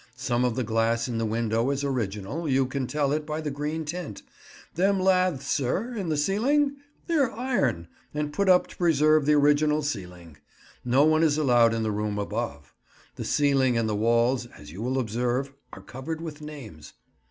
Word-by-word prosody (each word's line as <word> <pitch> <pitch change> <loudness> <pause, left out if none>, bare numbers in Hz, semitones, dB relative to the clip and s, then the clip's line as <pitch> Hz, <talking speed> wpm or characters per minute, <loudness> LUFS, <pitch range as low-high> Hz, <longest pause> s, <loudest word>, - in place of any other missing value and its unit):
Some 125 -1 0
of 125 -2 0
the 130 - -1
glass 115 +1 0
in 115 -2 -3
the 115 - 0
window 115 +2 0
is 140 0 -1
original; 130 - -3
you 135 0 +3
can 130 0 -3
tell 145 -1 0
it 150 +1 0
by 150 +1 -4
the 155 -2 -3
green 150 +3 -3
tint. 155 - -6 0.5
Them 195 +3 +2
laths, 185 -6 +2
sir, 185 - -1
in 195 -7 -3
the 155 - 0
ceiling? 275 - +1 0.3
They're 295 -8 +1
iron, 140 - -1 0.2
and 150 0 -3
put 200 +4 +1
up 180 -1 +5
to - - -13
preserve 155 -3 +3
the 150 - +5
original 150 +1 +3
ceiling. 90 - -6 0.5
No 130 +4 +3
one 155 0 +3
is 155 -2 +3
allowed 120 -6 +4
in 115 - -1
the 110 - 0
room 105 0 -2
above. 105 -9 -4 0.4
The - - -5
ceiling 135 -4 +2
and 115 -1 +1
the 105 - -1
walls, 120 +3 +2
as 75 -9 -14
you 95 +6 -8
will 130 +3 -1
observe, 125 +3 -1 0.2
are - - -10
covered 145 +5 -6
with 160 -2 -7
names. 135 - -10
135 Hz, 185 wpm, -26 LUFS, 115-155 Hz, 0.5 s, up